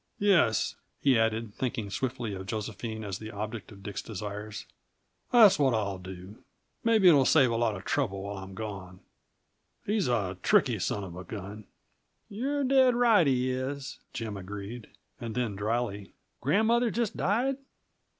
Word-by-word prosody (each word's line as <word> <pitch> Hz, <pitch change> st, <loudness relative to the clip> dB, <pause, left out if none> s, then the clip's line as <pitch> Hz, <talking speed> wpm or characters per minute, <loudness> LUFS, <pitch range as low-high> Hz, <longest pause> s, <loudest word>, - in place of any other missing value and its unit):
Yes," 175 Hz, -, +3 dB, 0.3 s
he 135 Hz, -2 st, +4 dB
added, 110 Hz, -1 st, 0 dB
thinking 115 Hz, -5 st, -3 dB
swiftly 120 Hz, -1 st, -2 dB
of 95 Hz, 0 st, -7 dB
Josephine 110 Hz, +1 st, -4 dB
as 100 Hz, -2 st, -4 dB
the 110 Hz, -, -7 dB
object 105 Hz, -1 st, -6 dB
of 100 Hz, -1 st, -13 dB
Dick's 100 Hz, -1 st, -4 dB
desires, 105 Hz, 0 st, -6 dB, 0.7 s
"that's 220 Hz, -9 st, +7 dB
what 135 Hz, -4 st, +3 dB
I'll 100 Hz, -3 st, -2 dB
do. 95 Hz, +3 st, -10 dB, 0.4 s
Maybe 225 Hz, -4 st, +5 dB
it'll 145 Hz, -6 st, +7 dB
save 130 Hz, -3 st, +5 dB
a -, -, 0 dB
lot 115 Hz, -2 st, +1 dB
of 95 Hz, -, -9 dB
trouble 100 Hz, -9 st, -1 dB
while 100 Hz, 0 st, -5 dB
I'm 95 Hz, 0 st, -9 dB
gone. 95 Hz, -4 st, -7 dB, 0.8 s
He's 210 Hz, -1 st, +1 dB
a 100 Hz, -7 st, -1 dB
tricky -, -, +3 dB
son 100 Hz, -, -1 dB
of 90 Hz, -3 st, -8 dB
a 90 Hz, -, -7 dB
gun." 105 Hz, +1 st, -8 dB, 0.6 s
"You're 275 Hz, +7 st, -1 dB
dead 260 Hz, -2 st, +4 dB
right; 230 Hz, -9 st, +5 dB
he 130 Hz, -1 st, +2 dB
is," 135 Hz, +2 st, -4 dB
Jim 110 Hz, -4 st, -5 dB
agreed. 105 Hz, +4 st, -7 dB, 0.3 s
And 115 Hz, -2 st, -5 dB
then, 120 Hz, -5 st, -1 dB
dryly: 105 Hz, -1 st, -2 dB, 0.2 s
"Grandmother 225 Hz, -, +3 dB
just 230 Hz, -2 st, -1 dB
died?" 245 Hz, +7 st, +1 dB
115 Hz, 155 wpm, -29 LUFS, 100-145 Hz, 0.8 s, that's